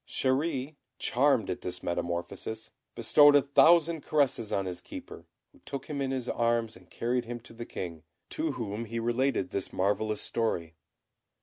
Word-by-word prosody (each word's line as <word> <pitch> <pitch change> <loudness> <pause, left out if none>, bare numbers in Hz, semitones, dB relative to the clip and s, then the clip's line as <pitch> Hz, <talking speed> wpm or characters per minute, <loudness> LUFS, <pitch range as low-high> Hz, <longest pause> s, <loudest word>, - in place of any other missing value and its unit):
Chéri, 140 +1 -1 0.2
charmed 125 -5 +2
at 90 - -4
this 90 0 -5
metamorphosis, 90 +6 -3 0.2
bestowed 145 +5 +6
a 145 - +6
thousand 160 +3 +5
caresses 135 -8 +1
on 95 - 0
his 90 -1 -5
Keeper, - - -10 0.2
who - - -22
took 140 -1 -6
him 145 -2 -4
in 135 - 0
his 130 -2 -3
arms 115 -2 0
and 90 -1 -17
carried 120 +1 -1
him 120 +1 -5
to 115 - -14
the 115 0 -8
King, 85 -3 -6 0.3
to - - -1
whom 110 +1 -4
he 115 +1 -5
related 120 -4 0
this 100 - -2
marvellous 105 +2 0
story. 85 -8 -1
115 Hz, 165 wpm, -29 LUFS, 100-135 Hz, 0.3 s, bestowed